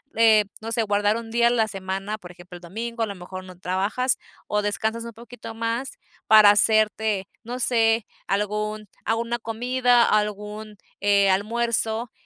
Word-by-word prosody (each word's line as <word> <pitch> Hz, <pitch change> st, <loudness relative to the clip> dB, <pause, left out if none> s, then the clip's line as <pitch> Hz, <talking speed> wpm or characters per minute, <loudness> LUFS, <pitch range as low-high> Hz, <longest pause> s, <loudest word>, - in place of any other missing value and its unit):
eh, 220 Hz, -2 st, +5 dB, 0.2 s
no 225 Hz, +1 st, -6 dB
sé, 230 Hz, -1 st, +1 dB
guardar 205 Hz, +1 st, +1 dB
un 225 Hz, -1 st, -8 dB
día 235 Hz, 0 st, +3 dB
a -, -, +4 dB
la 225 Hz, -2 st, +2 dB
semana, 195 Hz, +2 st, -4 dB
por 175 Hz, -1 st, -11 dB
ejemplo, 175 Hz, 0 st, -13 dB
el -, -, -17 dB
domingo, 230 Hz, +6 st, -6 dB
a 225 Hz, -, +1 dB
lo 200 Hz, -, -6 dB
mejor 185 Hz, +1 st, -9 dB
no 185 Hz, -1 st, -12 dB
trabajas 200 Hz, +8 st, 0 dB, 0.3 s
o 210 Hz, 0 st, 0 dB
descansas 220 Hz, +3 st, -2 dB
un 235 Hz, -, -8 dB
poquito 225 Hz, 0 st, -10 dB
más 230 Hz, +3 st, -3 dB, 0.3 s
para 215 Hz, -2 st, +8 dB
hacerte, 215 Hz, -2 st, +2 dB, 0.2 s
no 245 Hz, +2 st, -5 dB
sé, 225 Hz, -3 st, +2 dB, 0.2 s
algún 210 Hz, +2 st, -2 dB, 0.2 s
alguna 235 Hz, +1 st, -1 dB
comida, 245 Hz, +2 st, +2 dB
algún, 210 Hz, 0 st, -2 dB, 0.2 s
eh, 200 Hz, -1 st, +4 dB
almuerzo, 225 Hz, +2 st, 0 dB
215 Hz, 160 wpm, -24 LUFS, 205-230 Hz, 0.3 s, para